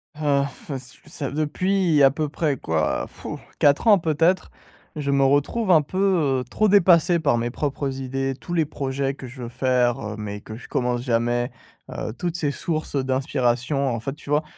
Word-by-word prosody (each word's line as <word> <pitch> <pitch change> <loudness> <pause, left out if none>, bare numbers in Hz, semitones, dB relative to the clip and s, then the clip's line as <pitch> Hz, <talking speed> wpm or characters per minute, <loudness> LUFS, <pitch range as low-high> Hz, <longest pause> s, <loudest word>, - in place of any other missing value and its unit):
Ah 145 -2 +1
faç 135 -2 -8
ç - - -18
ça 140 -3 -4
depuis 160 +2 +1
à 135 - +7
peu 150 +1 -2
près 150 -3 -1
quoi, 80 -1 -1
pfou, - - -8 0.2
4 145 +9 +3
ans 210 -2 +8
peut-être? 165 +2 +1 0.4
Je 145 -2 -3
me 140 0 +3
retrouve 145 +10 +2
un 160 -3 +7
peu, 165 -5 +1
heu, - - -4
trop 215 0 +2
dépassé 175 -3 +5
par 140 -7 +1
mes 120 +1 -1
propres 135 0 -3
idées, 135 0 -2
tous 175 - -6
les 165 -2 +2
projets 135 -1 -2
que 140 - -10
je 130 +1 -10
veux 120 - -5
faire, 125 0 +1
heu, 110 -2 -5
mais 105 -1 -5
que 110 +2 -9
je 115 - -11
commence 125 -1 -1
jamais, 120 0 0 0.4
heu, 110 - -5
toutes 175 +6 -3
ces 150 -5 0
sources, 155 +2 -3
heu, 135 - +1
d'inspiration 130 +1 0
en 115 -2 -2
fait. 135 +5 -4
Tu 145 - -13
vois? 150 +1 +2
140 Hz, 200 wpm, -23 LUFS, 125-155 Hz, 0.4 s, ans